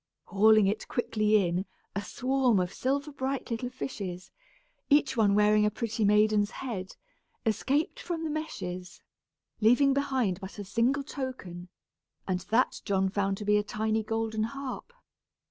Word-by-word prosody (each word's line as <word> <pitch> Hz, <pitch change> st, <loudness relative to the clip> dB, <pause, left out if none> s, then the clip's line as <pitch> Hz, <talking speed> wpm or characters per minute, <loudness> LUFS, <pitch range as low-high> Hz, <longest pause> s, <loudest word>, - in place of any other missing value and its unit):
Hauling 215 Hz, +2 st, +5 dB
it 205 Hz, +3 st, -1 dB
quickly 215 Hz, -4 st, +2 dB
in, 180 Hz, +3 st, -2 dB, 0.3 s
a 200 Hz, -, -1 dB
swarm 255 Hz, -4 st, +1 dB
of 180 Hz, +1 st, -2 dB
silver 280 Hz, +3 st, -1 dB
bright 265 Hz, -2 st, -3 dB
little 235 Hz, +2 st, -2 dB
fishes, 195 Hz, -8 st, -6 dB, 0.6 s
each 285 Hz, -2 st, +4 dB
one 205 Hz, -4 st, +3 dB
wearing 210 Hz, 0 st, +4 dB
a 210 Hz, -, +4 dB
pretty 220 Hz, 0 st, -2 dB
maiden's 210 Hz, 0 st, +4 dB
head, 215 Hz, -7 st, -6 dB, 0.5 s
escaped 280 Hz, -, 0 dB
from 345 Hz, -9 st, -4 dB
the 320 Hz, -, -2 dB
meshes, 185 Hz, -, -5 dB, 0.6 s
leaving 245 Hz, +5 st, +5 dB
behind 260 Hz, -9 st, 0 dB
but 190 Hz, +2 st, -8 dB
a 205 Hz, -, -5 dB
single 240 Hz, +8 st, +1 dB
token, 250 Hz, -, -6 dB, 0.6 s
and 185 Hz, -2 st, 0 dB
that 240 Hz, +4 st, +2 dB
John 190 Hz, -1 st, +1 dB
found 195 Hz, 0 st, 0 dB
to 210 Hz, -, -6 dB
be 210 Hz, 0 st, +4 dB
a 210 Hz, -, +1 dB
tiny 220 Hz, +1 st, -1 dB
golden 220 Hz, 0 st, -2 dB
harp. 275 Hz, -, -5 dB
220 Hz, 145 wpm, -29 LUFS, 200-265 Hz, 0.6 s, Hauling